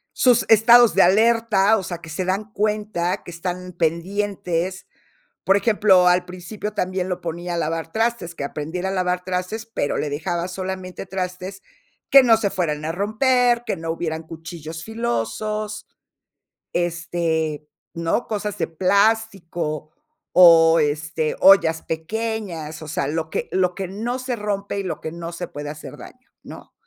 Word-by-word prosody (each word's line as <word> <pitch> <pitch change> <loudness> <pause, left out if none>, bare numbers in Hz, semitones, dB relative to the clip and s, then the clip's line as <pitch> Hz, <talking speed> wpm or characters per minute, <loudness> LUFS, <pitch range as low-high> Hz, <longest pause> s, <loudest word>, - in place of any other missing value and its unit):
Sus 245 -2 +4
estados 235 +2 +7
de - - +5
alerta, 220 +1 +4
o 205 - -2
sea, 175 -2 -5
que 165 -1 -11
se 185 +4 -3
dan 200 +3 -2
cuenta 205 -4 -1
que - - -9
están 180 +1 -5
pendientes. 180 +1 -2 0.6
Por 195 - +4
ejemplo, 200 -3 +4
al 180 0 +3
principio, 185 +4 -7
también 185 -2 -2
lo 180 - -3
ponía 175 +1 -4
a - - -1
lavar 165 0 -2
trastes, 225 -6 -1
que 140 - -5
aprendiera 160 +6 -4
a - - -2
lavar 180 -1 -1
trastes, 185 +5 -3
pero 225 -10 -2
le 150 - -2
dejaba 170 +4 -2
solamente 185 0 -6
trastes 185 +1 -5 0.5
que 275 - +9
no 235 -3 +5
se 210 -3 -1
fueran 155 -5 -2
a 160 - -2
romper, 240 +5 +2
que 220 - -1
no 165 -1 -5
hubieran 160 -1 -3
cuchillos 160 0 -8
filosos, 215 - -3 0.9
este, 165 -3 -1 0.3
¿no? 170 +7 -1
Cosas 210 -2 -3
de - - 0
plástico 185 -4 0 0.4
o, 165 -2 +7
este, 155 +1 -1
ollas 165 -4 +6
pequeñas, 170 -3 -4
o 155 - -8
sea, 140 - -1
lo 160 +1 -3
que - - -3
lo 180 -1 +1
que 190 -1 -4
no 230 +6 -3
se 255 -1 -3
rompe 200 -1 -3
y - - -2
lo 185 - -4
que 160 - -6
no 170 0 -7
se 175 +1 -6
puede 145 0 -6
hacer 150 +1 -9
daño, 255 +1 -14
¿no? - - -12
180 Hz, 160 wpm, -22 LUFS, 165-210 Hz, 0.9 s, que